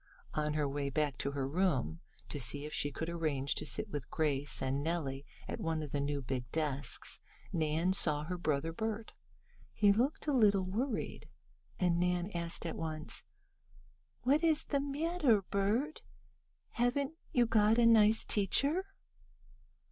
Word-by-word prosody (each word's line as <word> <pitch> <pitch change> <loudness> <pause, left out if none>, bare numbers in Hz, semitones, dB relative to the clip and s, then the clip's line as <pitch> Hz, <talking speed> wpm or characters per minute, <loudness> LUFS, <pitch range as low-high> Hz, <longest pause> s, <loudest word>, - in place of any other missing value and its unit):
On 150 0 -1
her 150 -2 +1
way 140 0 -2
back 145 -1 -1
to 140 - -1
her 135 -2 -1
room, 140 - 0 0.3
to 145 - -4
see 140 +4 0
if 150 - -7
she 145 - 0
could 160 - -4
arrange 155 -5 -1
to - - -3
sit - - -1
with 140 -3 -5
Grace 145 -2 0
and 135 +1 -1
Nellie 145 -4 -2 0.2
at - - -4
one 160 -1 -1
of 145 - -7
the 145 - -1
new 140 0 -1
big 125 -1 -4
desks, 145 -4 -2 0.3
Nan 160 +3 +1
saw 150 -5 +1
her 180 +3 -4
brother 155 0 0
Bert. 220 +3 -3 0.6
He 205 -1 +4
looked 250 +8 0
a 295 - +1
little 205 -6 +4
worried, 220 +6 -3 0.5
and 175 -2 +2
Nan 180 +2 0
asked 170 0 -3
at 165 - -3
once: 155 - -4 1.0
"What 285 +6 +3
is 320 -2 +4
the 280 - 0
matter, 285 - +2
Bert? 210 +11 0 0.7
Haven't 265 +5 0 0.2
you 245 -1 +4
got 220 -1 +4
a 240 - +5
nice 220 -1 +6
teacher?" 280 - +3
170 Hz, 155 wpm, -34 LUFS, 145-220 Hz, 1.0 s, nice